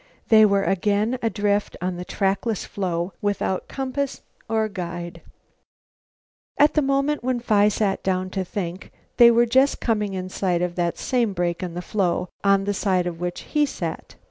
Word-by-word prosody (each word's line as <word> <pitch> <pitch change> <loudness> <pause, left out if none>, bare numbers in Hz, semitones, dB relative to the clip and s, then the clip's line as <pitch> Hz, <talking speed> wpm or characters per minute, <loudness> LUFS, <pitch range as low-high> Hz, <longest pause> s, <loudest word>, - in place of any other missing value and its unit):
They 215 -1 +7
were 200 -1 +2
again 205 +6 +1
adrift 205 -2 0
on 180 0 -2
the 180 - -5
trackless 195 +3 -1
floe 180 -2 -3
without 205 -2 -1
compass 270 +1 -3 0.3
or 220 -1 +1
guide. 175 -4 -6 1.4
At 295 +1 +5
the 305 - +3
moment 275 0 0
when 255 -1 0
Phi 210 -3 +3
sat 205 -2 0
down 185 -1 -1
to 190 -1 -2
think, 185 0 -5 0.3
they 235 -1 +9
were 235 0 +4
just 260 +4 +3
coming 210 -4 -1
in 185 0 -4
sight 180 -2 0
of 180 -1 -2
that 175 -1 -1
same 240 -5 0
break 175 -2 -1
in 175 -2 -5
the 175 - -4
floe, 180 -3 -1
on 200 -1 +4
the 205 +1 -1
side 190 -3 +1
of 170 -2 -4
which 175 0 -3
he 300 -1 0
sat. - - -6
200 Hz, 170 wpm, -23 LUFS, 180-230 Hz, 1.4 s, they